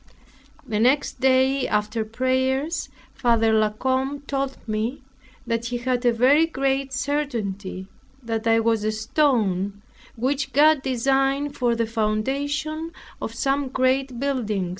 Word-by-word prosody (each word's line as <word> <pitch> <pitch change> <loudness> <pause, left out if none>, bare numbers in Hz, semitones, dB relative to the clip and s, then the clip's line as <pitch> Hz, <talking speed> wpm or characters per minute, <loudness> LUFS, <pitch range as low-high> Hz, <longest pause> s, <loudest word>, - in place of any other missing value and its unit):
The 215 -3 -1
next 260 +5 +2
day, 265 +1 +3
after 210 +2 0
prayers, 260 +7 -1 0.2
Father 225 -2 +2
La 215 -1 +3
Combe 260 +5 -1
told 275 -1 -3
me, 225 +5 -2 0.4
that 230 -1 -1
he 245 +1 -2
had 245 +1 -1
a - - +6
very 270 +7 +4
great 270 -2 -1
certainty, 230 -9 -3 0.4
that 225 0 -2
I 225 0 +4
was 225 -1 +1
a 215 - +1
stone 215 - 0 0.3
which 265 +4 -1
God 300 0 +5
designed 270 +2 0
for 240 -3 +1
the 230 0 0
foundation 280 +9 -2 0.3
of - - -5
some 275 0 0
great 260 -1 0
building. 220 -9 -1
255 Hz, 130 wpm, -23 LUFS, 225-275 Hz, 0.4 s, a